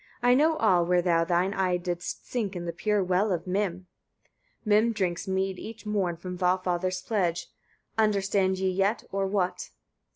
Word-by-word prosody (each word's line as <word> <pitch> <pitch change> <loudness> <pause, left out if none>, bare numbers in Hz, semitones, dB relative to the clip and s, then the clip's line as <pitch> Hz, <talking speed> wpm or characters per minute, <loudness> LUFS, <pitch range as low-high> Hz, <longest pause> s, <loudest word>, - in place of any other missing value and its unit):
I 245 0 +5
know 310 +5 +4
all, 185 - +3
where 175 0 +2
thou 170 -2 +3
thine 180 +3 +1
eye 185 -3 +1
didst 175 -1 -5
sink 210 -6 -2
in 175 -1 -4
the 170 - -3
pure 205 +3 0
well 185 +3 +1
of 170 -2 -2
Mim." 185 -1 -2 0.8
Mim 215 +2 +3
drinks 185 -5 -2
mead 190 0 -1
each 225 0 -9
morn 195 -5 -1
from 180 +2 -6
Valfather's 185 0 0
pledge. 180 -6 -1 0.5
Understand 195 -3 +2
ye 190 0 0
yet, 195 +4 0
or 195 0 0
what? 185 -2 -1
190 Hz, 165 wpm, -27 LUFS, 180-205 Hz, 0.8 s, I